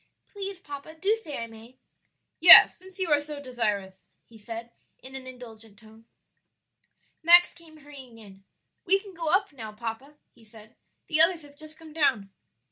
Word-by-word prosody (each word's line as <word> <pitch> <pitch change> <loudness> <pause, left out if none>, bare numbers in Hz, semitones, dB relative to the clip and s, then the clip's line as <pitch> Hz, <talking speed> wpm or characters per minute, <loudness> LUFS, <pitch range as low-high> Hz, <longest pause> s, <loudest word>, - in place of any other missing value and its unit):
"Please, 395 -2 -7
papa, 290 0 -11
do 390 +7 0
say 300 -8 -8
I 230 - -5
may." 230 +2 -16 0.6
"Yes, - - +9
since 375 +1 -18
you 370 -4 -2
are 290 -1 +3
so 295 0 -9
desirous," 210 -8 -5 0.2
he 230 - -21
said, 230 +2 -10 0.3
in 260 - -15
an 265 -1 -9
indulgent 225 -4 -13
tone. 220 +1 -19 1.2
Max 345 +2 +5
came 325 -2 -18
hurrying 275 -5 -14
in. 195 -3 -17 0.4
"We 390 +2 +2
can 395 -1 -15
go 330 -2 -5
up 380 -1 0
now, 220 -5 -10
papa," 230 +6 -8 0.2
he 230 - -24
said; 220 0 -16 0.3
"the 310 0 +1
others 335 -1 +4
have 305 +2 -13
come 320 -2 -15
down." 255 -11 -1
275 Hz, 165 wpm, -25 LUFS, 225-320 Hz, 1.2 s, Yes